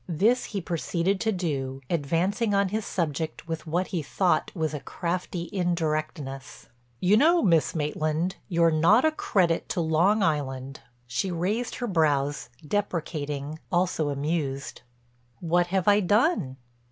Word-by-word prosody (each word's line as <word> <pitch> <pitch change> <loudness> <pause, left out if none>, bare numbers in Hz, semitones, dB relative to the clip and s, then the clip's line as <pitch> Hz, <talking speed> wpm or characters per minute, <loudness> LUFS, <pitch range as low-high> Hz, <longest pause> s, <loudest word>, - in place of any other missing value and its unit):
This 215 +10 +2
he 200 -3 -4
proceeded 175 +3 -1
to 220 - +1
do, 140 -8 -2
advancing 180 - 0
on 200 -1 +2
his 215 +2 -3
subject 160 -2 -3
with 160 -1 -5
what 175 +4 0
he 175 - -1
thought 165 +1 +1
was 160 -3 -1
a 150 - -3
crafty 170 +4 -4
indirectness: 155 -6 -2 0.3
"You 185 +8 +4
know, 330 +5 +4
Miss 165 -4 +3
Maitland, 155 +4 -1
you're 170 -2 +3
not 170 - +4
a 315 - +4
credit 180 - +1
to - - -1
Long 170 +6 +3
Island." 135 -4 -2 0.3
She 125 +10 -2
raised 195 +8 -1
her 245 - -3
brows, 145 -6 +1 0.2
deprecating, 155 -6 -3
also 175 -4 +1
amused: 140 -1 -2 0.6
"What 175 +1 +1
have 190 0 -1
I 205 0 +6
done?" 205 - +2
170 Hz, 140 wpm, -26 LUFS, 150-190 Hz, 0.6 s, I